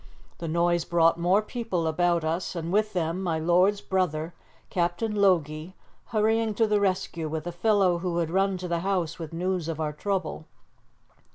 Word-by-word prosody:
The 170 - -4
noise 170 +1 +1
brought 165 0 +3
more 185 +5 +3
people 215 -7 -3
about 170 +1 +1
us, 165 +4 -2
and 170 +1 -3
with 215 +1 +2
them 170 0 -1
my 170 -4 0
lord's 180 +5 +3
brother, 170 -3 -1 0.4
Captain 175 +5 0
Logie, 175 -3 +1 0.3
hurrying 220 0 +1
to 225 - +3
the 210 -1 +2
rescue 185 -4 -1
with 155 0 -4
a 175 - -3
fellow 190 -1 +2
who 175 -1 -2
had 165 -2 -1
run 195 +1 +1
to 180 0 -5
the 170 -1 -1
house 180 -3 -1
with 160 -2 -6
news 180 0 -2
of 160 -1 -4
our 155 -1 -2
trouble. 180 -2 -3
175 Hz, 175 wpm, -26 LUFS, 165-195 Hz, 0.4 s, brought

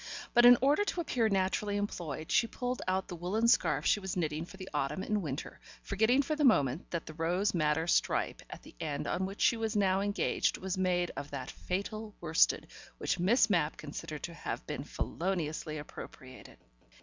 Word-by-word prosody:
But 240 0 +8
in 245 0 +9
order 290 +9 +4
to 360 -4 -2
appear 240 -8 +1
naturally 200 +1 0
employed, 170 -7 -4
she 230 - +4
pulled 250 +1 -3
out 190 +1 0
the 180 - -6
woollen 190 +7 0
scarf 150 - +3
she - - +4
was 190 -2 -4
knitting 155 -1 -1
for 190 - -13
the 190 -1 -8
autumn 150 +5 -1
and 210 0 0
winter, 145 -4 -5 0.2
forgetting 220 +7 +3
for 305 +3 -1
the 300 - 0
moment 150 - +3
that 170 -2 -3
the 155 - -8
rose 175 +6 0
madder 155 -1 +1
stripe 175 - +1
at - - -10
the - - -14
end 145 -1 -3
on 190 +1 -1
which 195 +1 -8
she 235 - +4
was 225 -1 -2
now 195 -2 +3
engaged 205 +1 0
was 190 0 -3
made 180 -2 +1
of 145 +1 -6
that 135 -3 -5
fatal 210 +3 -4
worsted 160 -1 +3 0.3
which - - -1
Miss 220 +6 +4
Mapp 170 -8 +1
considered 155 0 -7
to 170 - -5
have 115 - -5
been - - -4
feloniously 160 -4 -3
appropriated. 130 -3 -10
185 Hz, 190 wpm, -32 LUFS, 155-215 Hz, 0.3 s, in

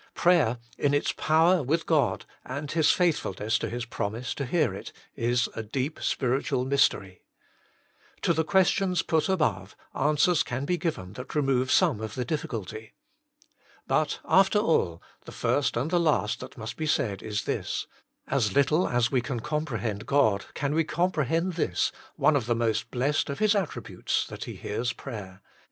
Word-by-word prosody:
prayer, 170 -10 +3 0.2
in 145 0 +2
its 145 - +1
power 165 +3 +3
with 155 +5 0
God, 155 -4 +1 0.2
and 140 +3 -5
His 160 -2 +3
faithfulness 115 - +1
to - - -3
His 120 0 -4
promise 115 +1 -3
to 140 - -4
hear 150 - +1
it, 100 - -8 0.2
is 120 +1 +1
a - - -3
deep 130 +7 -3
spiritual 130 -1 0
mystery. 130 -9 +1 1.0
To 170 - +3
the 160 0 +1
questions 190 +1 +2
put 160 0 +1
above 110 - 0 0.2
answers 150 +4 +3
can 130 +3 -3
be 175 +3 0
given 105 - -3
that 125 +6 -8
remove 135 -3 +1
some 110 - +3
of 110 -1 -5
the 125 - -2
diffi 150 +4 -2
culty. 110 0 -6 0.9
But, - - 0
after 195 +2 +4
all, 155 - +1 0.2
the - - -9
first 140 -5 0
and 135 +8 -1
the 175 - +3
last 150 -10 +1
that 130 +1 -10
must 110 -1 -6
be 155 - -2
said 105 -9 0
is 105 -1 -3
this: - - -2 0.4
As 110 -7 0
little 155 +5 +3
as 120 -1 +1
we 130 -3 +2
can 125 0 -3
compre 150 -2 -3
hend 105 -3 -3
God 110 -9 +3
can 145 0 -1
we 165 +1 +3
comprehend 165 +1 0
this, 125 - 0 0.2
one 155 - +3
of 125 -5 0
the 120 - +2
most 115 -2 0
blessed 135 +4 0
of 140 - -3
His 215 -1 +3
attributes, 195 -6 -2
that - - -7
He - - -7
hears 115 +3 -3
prayer. 100 -7 -8
135 Hz, 175 wpm, -27 LUFS, 115-160 Hz, 1.0 s, after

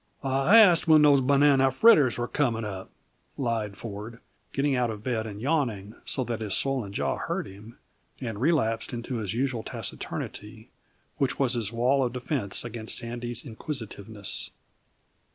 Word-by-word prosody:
"I 135 +10 +4
asked 180 -8 +6
when 155 -1 +7
those 145 -2 +6
banana 135 0 +4
fritters 145 - +5
are 120 0 -2
coming 120 -6 0
up," 95 -2 -6 0.5
lied 110 -6 -2
Ford, 110 +1 -7 0.3
getting 140 0 +1
out 125 -1 +1
of 105 -1 -6
bed 115 -3 -2
and 105 -1 -7
yawning 115 -7 -1
so 130 - 0
that 115 -2 -4
his 105 -3 -2
swollen 130 -7 -1
jaw - - -1
hurt - - -3
him, 105 +5 -13 0.4
and 115 -4 -5
relapsed 125 -8 +1
into 120 +1 -4
his 110 -2 -3
usual 130 -2 -1
taciturnity, - - -5 0.5
which 135 -2 0
was 130 -3 +1
his 115 -4 -1
wall 125 +4 +2
of 120 -1 -2
defense 125 -5 -2
against 115 -1 -4
Sandy's 120 0 -4
inquisitiveness. 110 -5 -5
120 Hz, 155 wpm, -27 LUFS, 110-135 Hz, 0.5 s, when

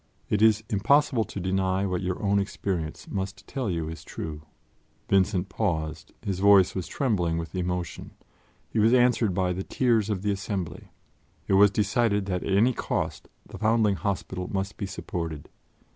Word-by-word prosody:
It 105 - +2
is 110 -1 +5
impossible 115 +3 +3
to - - -7
deny 95 +1 0
what 90 -2 -1
your 90 -1 -2
own 100 0 +3
experience 95 -5 -3
must 95 0 -4
tell 130 -6 -3
you 85 -3 -2
is 80 0 -7
true." 75 -1 -6 0.7
Vincent 95 -1 +2
paused; 80 -5 -2
his 95 -2 -2
voice 100 -2 +6
was 95 -3 -4
trembling 90 -11 0
with 85 0 -5
emotion; 90 -1 -3 0.6
he 115 - -2
was 115 +4 +5
answered 120 -6 +3
by 90 -1 +1
the 95 - -3
tears 115 -1 +1
of 100 -3 -2
the 105 - +1
assembly. 95 -2 -4 0.6
It - - +1
was 100 +1 +7
decided 105 0 +1
that 90 -2 -2
at - - -3
any 110 +6 +4
cost - - -3 0.2
the - - -10
Foundling 110 -1 +3
Hospital 90 0 -3
must 95 0 -2
be 100 - -4
supported. 85 -5 -5
95 Hz, 165 wpm, -26 LUFS, 90-105 Hz, 0.7 s, was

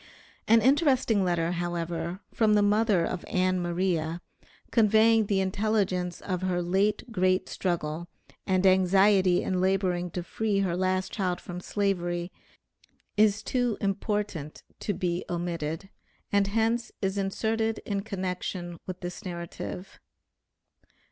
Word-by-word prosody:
An 225 0 +5
interesting 260 - +3
letter, 170 -2 +1
however, 175 0 -3
from 215 -2 +3
the 205 - +4
mother 205 -4 +3
of 180 0 -4
Ann 185 0 +1
Maria, 175 -2 -1 0.5
conveying 220 -1 +4
the 200 -2 +1
intelligence 190 -3 0
of 185 -2 -3
her 185 -1 0
late 200 +6 0
great 185 -2 +1
struggle 170 -2 -2 0.4
and 185 0 +2
anxiety 190 0 +4
in 185 -1 0
laboring 185 -2 +1
to 175 +1 -4
free 205 +2 -1
her 180 -3 0
last 185 +1 0
child 180 -3 -1
from 180 0 -7
Slavery 175 -3 -1 0.8
is 210 0 +3
too 245 -4 0
important 195 -6 -2 0.2
to 205 - -2
be 175 0 -1
omitted, 170 +1 -3 0.4
and 200 -1 +3
hence 225 +3 0
is 195 +1 0
inserted 220 +3 0
in 200 -1 -1
connection 180 -3 -4
with 185 -1 -6
this 175 -1 -6
narrative. 180 +1 -7
185 Hz, 125 wpm, -28 LUFS, 175-205 Hz, 0.8 s, An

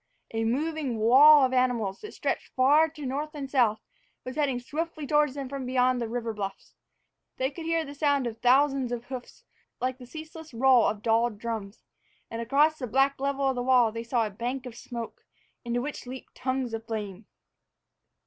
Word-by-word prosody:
A 225 0 0
moving 285 0 -1
wall 270 +6 +7
of 260 - -2
animals, 245 -6 0
that 425 - -9
stretched - - -3
far 290 +5 +5
to 300 -2 -9
north 295 +4 -3
and 280 -2 -5
south, 225 -6 +2 0.4
was 255 - -6
heading 280 -5 0
swiftly 310 +4 -4
toward 295 0 +3
them 275 -2 -4
from 275 0 -5
beyond 255 0 +2
the 230 - -2
river 230 -1 -3
bluffs. 195 -2 -6 0.6
They 260 +1 0
could 330 +2 -8
hear 330 -1 0
the 285 - -8
sound 285 -2 +1
of 230 -1 -5
thousands 265 +1 +3
of 240 -1 -4
hoofs, 255 -2 -8 0.4
like 255 +1 -2
the 250 - -11
ceaseless 315 -1 -10
roll 255 0 +5
of 210 0 -3
dulled 225 -1 +2
drums, 220 -2 -5 0.5
and 230 0 -4
across 295 +6 +3
the 250 - -3
black 270 +4 +2
level 275 0 0
of 265 - +2
the 245 - -2
wall 245 -3 +4
they 230 +1 -5
saw 235 -1 0
a 210 - -5
bank 245 +6 -4
of 245 -2 -8
smoke, 235 -1 -7 0.4
into 240 +1 -1
which 290 -3 -6
leaped 260 +1 -9
tongues 260 -2 -2
of 225 0 -4
flame. 210 -3 -5
255 Hz, 190 wpm, -27 LUFS, 235-280 Hz, 0.6 s, wall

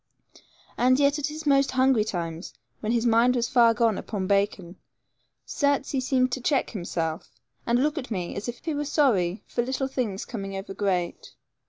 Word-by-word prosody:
And 255 +2 +4
yet 285 +1 +3
at 295 - -1
his 310 +1 -7
most 275 -1 +3
hungry 260 -3 +3
times, 170 -4 -5 0.2
when 215 - -2
his 235 0 +1
mind 235 +2 +4
was 240 -1 0
far 235 -2 +4
gone 225 -2 +2
upon 200 -4 -4
bacon, 195 -2 0 0.7
certes 285 -1 0
he 270 - 0
seemed 255 -1 +1
to 260 - -3
check 270 +2 +1
himself 165 -5 -3 0.4
and 235 0 +3
look 300 +1 0
at 260 - -8
me 180 -6 -3
as 200 +4 -4
if 240 - -8
he 320 - -1
were 295 0 -2
sorry 220 - +1
for 240 - -2
little 265 +2 -2
things 235 -7 -3
coming 195 -4 -6
over 195 0 -6
great. 185 -4 -2
235 Hz, 185 wpm, -26 LUFS, 195-270 Hz, 0.7 s, And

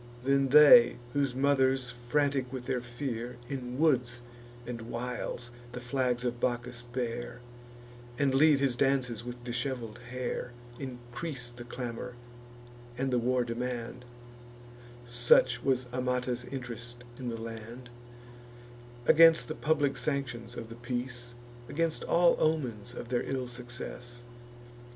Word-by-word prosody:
Then 135 0 +3
they, 150 - +9 0.2
whose 140 -3 +1
mothers, 135 -2 +2
frantic 130 +1 0
with 130 -2 -5
their 130 -2 -1
fear, 120 -1 -5
In 125 -2 -5
woods 125 -6 +2 0.4
and 120 -1 -5
wilds 120 0 -4 0.2
the 125 - -4
flags 125 0 -1
of 120 0 -2
Bacchus 120 0 -2
bear, 120 0 -4 0.8
And 140 -2 +2
lead 145 +1 +6
his 135 -3 +1
dances 125 -4 +1
with 120 0 -7
dishevel'd 120 -2 -3
hair, 125 -1 -3 0.3
Increase 125 +1 -5
the 120 0 -9
clamour, 120 0 -5 0.8
and 135 0 0
the 125 - +3
war 125 +1 +2
demand, 120 0 -4 1.0
(Such 120 0 +4
was 130 -2 +1
Amata's 125 -1 -1
int'rest 120 -2 -7 0.2
in 125 -2 -3
the 115 - -4
land,) 115 +2 -8 1.1
Against 165 +3 +7
the - - -1
public 150 -3 +1
sanctions 120 -5 -3
of 115 -1 -6
the 115 - -8
peace, 120 0 -4 0.3
Against 165 +1 0
all 170 0 +5
omens 120 -7 0
of 120 - -7
their 120 -1 +1
ill 130 -2 -3
success. 120 0 -7
125 Hz, 125 wpm, -30 LUFS, 120-135 Hz, 1.1 s, they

